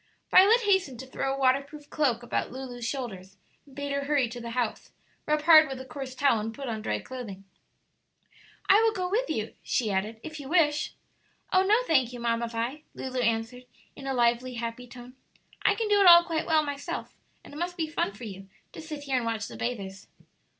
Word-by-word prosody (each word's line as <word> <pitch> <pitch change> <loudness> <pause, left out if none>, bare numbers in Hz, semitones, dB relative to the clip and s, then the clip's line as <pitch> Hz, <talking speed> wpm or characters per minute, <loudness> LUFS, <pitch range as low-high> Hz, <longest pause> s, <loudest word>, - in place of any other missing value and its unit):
Violet 425 +6 +7
hastened 380 - +1
to - - -9
throw 270 +1 -3
a 270 - -2
waterproof 275 +3 0
cloak 255 -6 +1
about 240 - -2
Lulu's 250 -2 -7
shoulders, 195 -8 -6 0.3
and 270 - -17
bade 285 0 -4
her 280 0 -1
hurry 280 -4 +2
to 240 +1 -8
the 235 - -6
house, 240 -3 -2 0.4
rub 300 0 +1
hard 315 -1 +8
with 265 -2 -6
a 260 - -8
coarse 260 0 -7
towel, 265 -4 +3
and 220 +1 -5
put 275 -1 -6
on 220 -2 -3
dry - - -1
clothing. 225 -7 -8 1.2
"I 400 +3 +6
will 450 -1 +3
go 365 -3 -2
with 460 +7 0
you," - - -3
she 225 -5 -1
added, 210 +4 -2
"if 315 -1 -7
you 275 -2 -8
wish." 300 -3 +2 0.6
"Oh 370 - +6
no, 415 +3 +4
thank 260 - +2
you, 245 - -7
Mamma 235 0 0
Vi," 235 +6 -3
Lulu 260 -1 -4
answered, 230 +1 -1 0.3
in 275 - -9
a 270 - -1
lively, 240 +1 +1
happy 235 +1 -5
tone. 245 +1 -12 0.5
"I 410 - +3
can 445 0 -2
do 410 -1 +4
it 385 - +6
all 345 0 +10
quite 330 -1 -2
well 315 -1 +3
myself, 285 -1 -5 0.3
and - - -13
it - - -8
must 350 +2 -3
be 325 - 0
fun 310 -9 -1
for 210 - -12
you 195 -3 -8 0.2
to - - -9
sit 305 -2 -7
here 270 -2 0
and 245 - -1
watch 225 -1 -2
the - - -10
bathers." 200 -5 -5
265 Hz, 215 wpm, -27 LUFS, 235-310 Hz, 1.2 s, all